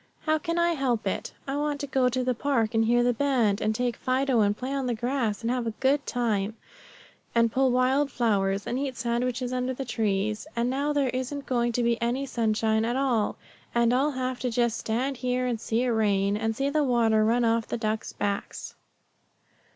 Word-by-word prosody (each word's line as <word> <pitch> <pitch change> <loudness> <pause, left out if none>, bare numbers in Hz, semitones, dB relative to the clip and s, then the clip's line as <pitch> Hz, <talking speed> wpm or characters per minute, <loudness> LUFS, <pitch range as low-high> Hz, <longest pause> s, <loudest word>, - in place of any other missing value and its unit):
"How 310 0 +2
can 335 +1 -2
I 340 0 +3
help 260 -8 0
it? - - -2 0.2
I 270 - -2
wanted 295 0 -1
to - - -2
go 265 -2 +2
to 255 +1 -1
the 250 0 +1
park 240 -3 0
and 225 0 +3
hear 240 +1 +3
the 245 0 +3
band, 240 -6 +1
and 215 0 0
take 245 0 -1
Fido 260 -1 +1
and 205 0 +2
play 260 +2 -4
on 270 -2 -1
the 240 - 0
grass, 235 -2 -1
and 230 - 0
have 250 -2 -1
a 225 - -3
good 275 +1 +2
time, 220 -3 -1 0.8
and 230 -1 +4
pull 265 +2 +2
wild 260 +3 +2
flowers, 200 -5 0
and 250 - -2
eat 270 -3 -3
sandwiches 245 +1 -1
under 255 0 -1
the 270 - -4
trees; 215 0 -1
and 235 +1 0
now 285 +3 0
there 285 -3 +1
isn't 260 +3 -4
going 240 -2 +1
to 245 - 0
be 235 0 +1
any 245 +4 0
sunshine 220 -3 +1
at 235 +2 -1
all, 255 -6 +1 0.4
and 235 0 +3
I'll 270 +4 +2
have 255 -1 -3
to 250 - -1
just 235 -1 0
stand 255 +5 -1
here 250 0 -1
and 235 -3 -2
see 230 +1 0
it 255 - +1
rain, 205 -3 +2
and 225 +1 -1
see 275 +3 -1
the 305 0 +2
water 230 -4 +3
run 235 +2 +2
off 230 0 +1
the - - -2
ducks' 220 -1 -2
backs." 200 -1 -4
245 Hz, 215 wpm, -27 LUFS, 225-265 Hz, 0.8 s, and